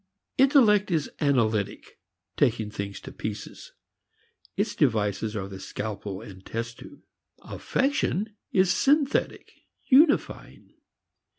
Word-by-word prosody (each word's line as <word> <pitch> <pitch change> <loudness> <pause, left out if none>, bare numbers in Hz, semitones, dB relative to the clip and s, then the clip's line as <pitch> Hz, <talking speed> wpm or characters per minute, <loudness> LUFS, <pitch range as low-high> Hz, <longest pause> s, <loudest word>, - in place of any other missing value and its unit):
Intellect 235 -7 +5
is 160 -5 -1
analytic, 115 -8 0 0.4
taking 110 -3 +1
things 100 -1 -5
to - - -9
pieces; 105 -1 -7 0.8
its - - 0
devices 105 0 0
are 95 -2 -3
the 95 -1 -9
scalpel 100 -1 -5
and 95 -4 -12
test 115 +2 -5
tube. 290 - -13 0.4
Affection 220 -7 -1 0.2
is 185 -2 +3
synthetic, 285 0 +1 0.3
unifying. 290 +3 +2
115 Hz, 100 wpm, -26 LUFS, -, 0.8 s, Intellect